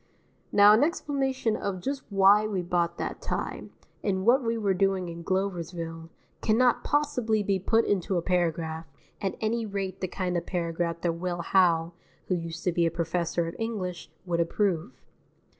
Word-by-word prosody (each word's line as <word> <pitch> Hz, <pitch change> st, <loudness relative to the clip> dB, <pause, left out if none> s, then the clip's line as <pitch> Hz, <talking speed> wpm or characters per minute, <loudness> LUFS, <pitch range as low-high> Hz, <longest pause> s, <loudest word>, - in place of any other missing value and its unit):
Now 205 Hz, +1 st, +8 dB
an 220 Hz, -, +5 dB
explanation 270 Hz, -7 st, 0 dB
of 195 Hz, -2 st, -3 dB
just 275 Hz, +8 st, -3 dB
why 200 Hz, +1 st, +5 dB
we 195 Hz, -4 st, -2 dB
bought 170 Hz, -1 st, 0 dB
that -, -, -4 dB
tie, -, -, -3 dB, 0.4 s
and 190 Hz, -2 st, 0 dB
what 250 Hz, +4 st, +5 dB
we 230 Hz, -1 st, -1 dB
were 205 Hz, -3 st, +1 dB
doing 190 Hz, -1 st, +1 dB
in 170 Hz, 0 st, -7 dB
Gloversville, 170 Hz, -3 st, -3 dB, 0.3 s
cannot 240 Hz, +3 st, +3 dB
possibly 250 Hz, -8 st, +1 dB
be 195 Hz, -1 st, +1 dB
put 225 Hz, +5 st, +2 dB
into 190 Hz, -1 st, 0 dB
a -, -, +1 dB
paragraph, 165 Hz, -3 st, -1 dB, 0.3 s
at 195 Hz, -, -1 dB
any 230 Hz, +1 st, 0 dB
rate 195 Hz, -3 st, -4 dB
the 185 Hz, -, 0 dB
kind 180 Hz, 0 st, -2 dB
of 170 Hz, -, -4 dB
paragraph 170 Hz, -1 st, -2 dB
that 170 Hz, -1 st, +1 dB
Will 175 Hz, +1 st, -3 dB
Howe 170 Hz, -3 st, +3 dB, 0.4 s
(who -, -, +2 dB
used 165 Hz, -1 st, -4 dB
to 180 Hz, -, +2 dB
be 170 Hz, 0 st, +2 dB
a -, -, +2 dB
professor 170 Hz, +1 st, -1 dB
of 165 Hz, -, -6 dB
English) 185 Hz, -8 st, -4 dB, 0.2 s
would 170 Hz, -2 st, -1 dB
approve. 170 Hz, -5 st, -1 dB
185 Hz, 170 wpm, -27 LUFS, 170-210 Hz, 0.4 s, Now